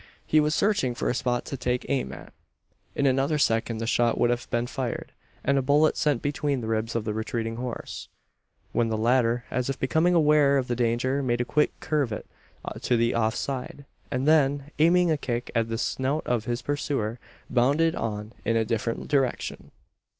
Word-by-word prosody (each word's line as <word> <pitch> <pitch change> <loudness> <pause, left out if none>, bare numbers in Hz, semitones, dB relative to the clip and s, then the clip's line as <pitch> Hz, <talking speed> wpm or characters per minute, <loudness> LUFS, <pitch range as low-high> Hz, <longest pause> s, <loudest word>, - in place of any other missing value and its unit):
He 155 - +4
was 150 0 +2
searching 165 - +1
for - - 0
a - - 0
spot 120 0 -1
to - - -4
take 125 -1 -1
aim 135 -2 -1
at. - - -11 0.6
In 140 - +1
another 135 +3 +2
second 115 -4 +1
the 115 - -3
shot 120 +1 +2
would 120 - +3
have 120 0 -3
been 120 0 0
fired, 125 -1 -4 0.3
and 140 0 +2
a - - +1
bullet 145 +4 +3
sent 145 -5 +1
between 145 -1 -1
the 115 - -5
ribs 110 +1 -1
of 115 -2 -1
the 105 - -1
retreating 115 +1 -3
horse, 125 -1 -6 0.6
when 120 - +1
the 110 -1 -1
latter, 120 +1 +2
as 125 +1 -1
if 135 - -2
becoming 160 +6 +2
aware 150 -3 +5
of 130 -2 -1
the 120 - -1
danger, 125 +3 +1
made 120 -3 0
a 120 - 0
quick 150 +4 +1
curvet 140 -9 -1 0.6
to 120 - +2
the 115 +1 +2
off 110 -1 +1
side; 135 +1 -4 0.2
and 130 +2 -1
then, 145 -2 +3
aiming 175 +2 +4
a 155 - +2
kick 120 -3 -3
at 115 -1 +1
the 115 - -2
snout 135 +6 -1
of 120 -3 0
his 120 0 -2
pursuer, 135 -5 -2 0.3
bounded 145 +7 +2
on 105 0 -4
in 115 - +1
a 115 -1 +2
different 115 +1 -2
direction! 135 -4 -1
125 Hz, 195 wpm, -26 LUFS, 115-145 Hz, 0.6 s, aware